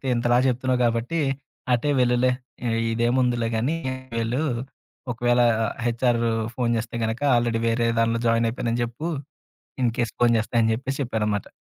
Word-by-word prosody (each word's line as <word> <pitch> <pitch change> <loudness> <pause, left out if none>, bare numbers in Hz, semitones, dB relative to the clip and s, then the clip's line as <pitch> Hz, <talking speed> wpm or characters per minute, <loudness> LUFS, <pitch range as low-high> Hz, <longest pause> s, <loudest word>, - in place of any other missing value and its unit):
ఇంతలా 120 0 +2
చెప్తున్నావు 130 0 +1
కాబట్టి, 120 +8 0 0.5
అటే 125 +4 +1
వెళ్ళులే, 125 +1 +3 0.6
ఇదేముందిలే 120 0 +1
గానీ, 130 +9 0 0.4
వెళ్ళు. 115 +4 -1 0.7
ఒకవేళ 120 +1 +2 0.4
హెచ్ఆర్ 120 0 +1 0.4
ఫోను 120 -2 0
చేస్తే 115 +1 -5
గనుక, 110 +1 -2
ఆల్రెడీ 120 -1 +1
వేరే 115 +1 +1
దానిలో 115 0 +1
జాయిన్ 115 0 +3
అయిపోయానని 115 0 -2
జెప్పు, 120 +8 -4 0.7
ఇన్‌కెస్ 120 -1 0
ఫోను 120 -1 +4
చేస్తే" 110 - -7
అని 110 - +2
చెప్పేసి 135 +3 -4
చెప్పారన్నమాట 105 -5 -1
120 Hz, 130 wpm, -24 LUFS, 115-125 Hz, 0.7 s, ఫోను